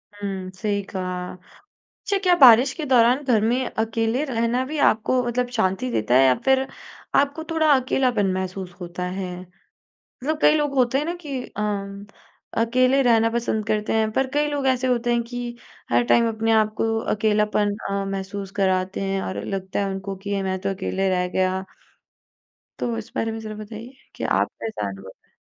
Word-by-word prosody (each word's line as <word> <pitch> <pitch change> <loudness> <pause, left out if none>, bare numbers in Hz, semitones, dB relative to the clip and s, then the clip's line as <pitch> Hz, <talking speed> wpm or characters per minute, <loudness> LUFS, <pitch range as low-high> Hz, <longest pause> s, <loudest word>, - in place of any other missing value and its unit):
हुँ, 195 -2 -5
सही 205 +1 -1
कहा। 185 -1 -4 0.7
अच्छा 405 - +1
क्या 365 -2 +5
बारिश 250 +1 +8
के 315 - -5
दौरान 250 +1 +4
घर 240 -6 +2
में 245 +4 +1
अकेले 225 +4 -1
रहना 240 -1 0
भी 305 +4 -5
आपको 230 +4 +2
मतलब 245 +1 0
शांति 185 - 0
देता 115 +1 +1
है 135 +1 +6
या 130 -1 +5
फ़िर 265 0 +3 0.5
आपको 285 +3 0
थोड़ा 315 -2 +3
अकेलापन 250 -6 +1
महसूस 185 -1 -4
होता 175 +1 -5
है? 180 0 -4 0.6
मतलब 300 +4 -5
कई 300 - +6
लोग 295 -2 0
होते 255 0 +2
हैं 290 - -1
ना 340 +2 -2
कि 275 -3 -3
अ, - - -8 1.0
अकेले 255 +3 +3
रहना 230 -2 +4
पसंद 225 -2 -1
करते 215 -1 0
हैं 220 -1 +2
पर 265 +4 +1
कई 295 0 +2
लोग 285 -2 -2
ऐसे 260 -1 +2
होते 240 -1 +1
हैं 235 0 +2
कि 240 0 -6 0.3
हर 120 +1 +4
टाइम 230 - +4
अपने 225 0 0
आप 215 -1 +3
को 225 0 0 0.2
अकेलापन 210 -1 +1
अ, 200 0 -1
महसूस 195 0 -5
कराते 185 0 +1
हैं 195 0 -1
और 190 - -4
लगता 190 -1 -4
है 200 - 0
उनको 195 0 -5
कि 200 +2 -8
ये 200 -1 0
मैं 190 0 -2
तो 195 - -1
अकेले 195 0 -1
रह 180 -1 +1
गया। 185 +1 0 1.2
तो 235 -2 -2
इस 225 - -7
बारे 225 - -1
में 225 - -5
ज़रा 215 -1 -7
बताइए 215 +4 -9 0.2
कि - - -6
आपका - - -1
क्या 215 - -3
अनुभव 95 -1 -9
है? - - -37
220 Hz, 185 wpm, -23 LUFS, 190-250 Hz, 1.2 s, बारिश